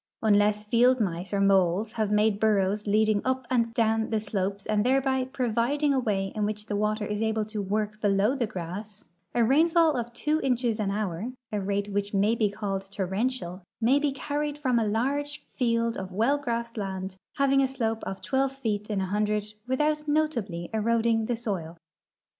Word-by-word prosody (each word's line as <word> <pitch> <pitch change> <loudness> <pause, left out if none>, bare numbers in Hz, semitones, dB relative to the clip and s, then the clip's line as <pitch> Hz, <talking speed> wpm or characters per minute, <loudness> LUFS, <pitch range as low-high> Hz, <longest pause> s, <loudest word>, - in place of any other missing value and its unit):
Unless 210 0 +3
field 245 +4 +4
mice 180 -3 -2
or 200 - 0
moles 195 +1 +3
have 215 -2 -1
made 210 0 +2
burrows 210 -1 +1
leading 215 0 +3
uj) 260 0 -1
and 230 -2 +2
down 225 -1 +2
the 220 - +1
slopes 200 -1 -3
and 210 -1 +1
thereb}'' 265 0 +1
providing 255 +5 +1
a 265 - +2
way 195 -5 -1
in 215 - -2
which 210 0 -2
the 210 - -3
water 210 +1 0
is 210 +1 -3
able 220 -1 0
to 215 -1 -4
work 210 +2 -2
below 205 +3 +3
the 245 -5 -1
grass, 200 +3 -7 0.3
a 240 - +4
rainfall 320 +5 +4
of 240 -1 -3
two 300 +6 0
inches 245 -4 0
an 205 -2 0
hour, 205 +2 -2 0.2
a 210 -1 -1
rate 200 +1 -2
which 205 0 -1
may 205 +3 +3
be 220 -3 +1
called 195 -2 -4
torrential, 195 0 -2 0.2
ma}" 245 +5 +4
be 290 -1 +1
carried 290 +2 -3
from 255 -5 +1
a 220 - 0
large 285 +7 -1
field 230 -2 0
of 190 0 -6
well 230 +10 +2
grassed 235 -3 -3
land 190 -2 -4 0.2
having 275 -1 +3
a 270 - +3
slope 225 -4 -2
of 195 - -6
twelve 270 0 +1
feet 220 -6 -3
in 205 -2 0
a - - 0
hundred 210 +1 -1
without 300 +3 0
notably 235 - 0
eroding 225 0 +1
the 240 - 0
soil. 185 -8 -4
220 Hz, 185 wpm, -27 LUFS, 205-255 Hz, 0.3 s, field